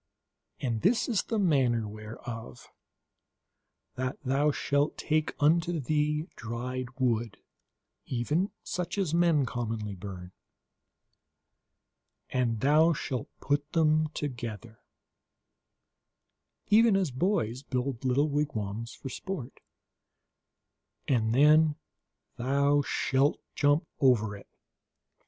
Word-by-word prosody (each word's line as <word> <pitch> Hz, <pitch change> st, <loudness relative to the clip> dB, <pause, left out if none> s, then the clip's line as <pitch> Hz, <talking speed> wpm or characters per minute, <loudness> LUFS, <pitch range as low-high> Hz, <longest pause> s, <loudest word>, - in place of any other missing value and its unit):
And 115 Hz, -4 st, -2 dB
this 225 Hz, +2 st, +3 dB
is 225 Hz, -6 st, +1 dB
the 225 Hz, -, -3 dB
manner 135 Hz, -, +3 dB
thereof: 110 Hz, -, -8 dB, 1.3 s
that 130 Hz, +1 st, -3 dB
thou 140 Hz, +3 st, +2 dB
shalt 145 Hz, 0 st, 0 dB
take 155 Hz, -1 st, 0 dB
unto 165 Hz, +3 st, +3 dB
thee 150 Hz, +2 st, 0 dB
dry 125 Hz, +2 st, -4 dB
wood, 120 Hz, -3 st, 0 dB, 0.7 s
even 150 Hz, -, 0 dB
such 180 Hz, 0 st, -3 dB
as 185 Hz, -6 st, 0 dB
men 170 Hz, -5 st, +3 dB
commonly 115 Hz, -4 st, -3 dB
burn, 90 Hz, -1 st, -8 dB, 2.0 s
and 120 Hz, -4 st, 0 dB
thou 155 Hz, +4 st, +5 dB
shalt 130 Hz, -5 st, -4 dB
put 145 Hz, +1 st, -1 dB
them 155 Hz, -1 st, +3 dB
together, 120 Hz, -5 st, -5 dB, 1.9 s
even 225 Hz, 0 st, +6 dB
as 190 Hz, -7 st, +1 dB
boys 130 Hz, -, 0 dB
build 130 Hz, -2 st, -3 dB
little 130 Hz, +3 st, +2 dB
wigwams 115 Hz, -7 st, -3 dB
for 135 Hz, -, -7 dB
sport, 140 Hz, -4 st, -6 dB, 1.5 s
and 115 Hz, -4 st, +2 dB
then 150 Hz, +2 st, +5 dB, 0.6 s
thou 140 Hz, +3 st, +2 dB
shalt 135 Hz, 0 st, +1 dB
jump 145 Hz, +3 st, +2 dB
over 110 Hz, -6 st, +3 dB
it. 100 Hz, -, -13 dB
135 Hz, 95 wpm, -29 LUFS, 120-155 Hz, 2.0 s, even